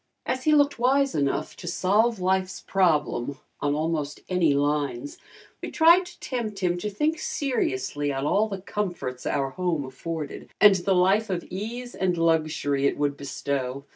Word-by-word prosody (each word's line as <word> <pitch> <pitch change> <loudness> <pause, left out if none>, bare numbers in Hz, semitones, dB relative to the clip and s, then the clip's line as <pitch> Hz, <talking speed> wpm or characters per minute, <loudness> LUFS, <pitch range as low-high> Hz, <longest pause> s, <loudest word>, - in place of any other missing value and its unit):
As 255 0 -2
he 305 -1 +5
looked 285 -3 +3
wise 270 +2 +3
enough 140 -1 -1
to 175 - -9
solve 205 +6 +2
life's 185 0 0
problem 150 -8 +1 0.2
on 145 0 0
almost 155 -2 -2
any 170 -6 +3
lines, 145 -2 -1 0.4
we - - -4
tried 340 +3 +5
to 355 - -14
tempt 230 -5 -4
him 180 -2 0
to 210 - -3
think 300 +10 0
seriously 145 - -1
on 135 0 -2
all 215 +8 +2
the 195 -2 -5
comforts 175 -11 -4
our 135 -1 0
home 175 -5 -1
afforded 150 +3 -6
and 210 -1 +8
the 190 +1 +1
life 195 +4 +3
of 180 -2 -2
ease 235 +6 -5
and 180 -2 0
luxury 155 -4 +1
it - - -1
would 145 -1 0
bestow. 140 -1 -4
175 Hz, 165 wpm, -25 LUFS, 145-210 Hz, 0.4 s, and